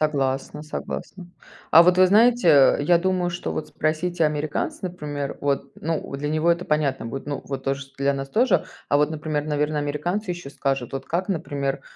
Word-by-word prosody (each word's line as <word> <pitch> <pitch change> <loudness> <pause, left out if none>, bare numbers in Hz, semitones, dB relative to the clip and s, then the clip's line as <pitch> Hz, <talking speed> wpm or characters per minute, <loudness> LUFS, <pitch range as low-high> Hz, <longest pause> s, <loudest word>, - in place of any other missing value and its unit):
Согласна 140 -1 -1
согласна. 175 +4 -6 0.4
А 165 - +9
вот 180 +1 +4
вы 185 - +7
знаете, 225 0 +4
э, 140 -1 +6
я 170 +3 +4
думаю, 180 -1 0
что 175 - -4
вот 155 - -4
спросите 160 +2 -1
американца, 150 0 -2
например, 150 -6 -4
вот, 140 -1 -1
ну, 160 -3 -3
для 145 +1 -3
него 155 +3 +3
это 170 +1 -4
понятно 140 -5 0
будет, 135 +4 -6
ну 145 -1 -3
вот 135 -1 -5
тоже, 135 0 -1
что 135 0 -17
для 140 +1 +1
нас 135 0 -5
тоже. 245 - +2 0.2
А 145 - +5
вот, 150 +1 +2
например, 150 -1 -2
наверно, 150 0 0
американцы 175 +8 -2
ещё 175 -5 -6
скажут, 135 -4 -2
вот, 135 0 -5
как, 180 +4 -2
например, 140 -6 -2
150 Hz, 190 wpm, -23 LUFS, 140-175 Hz, 0.4 s, А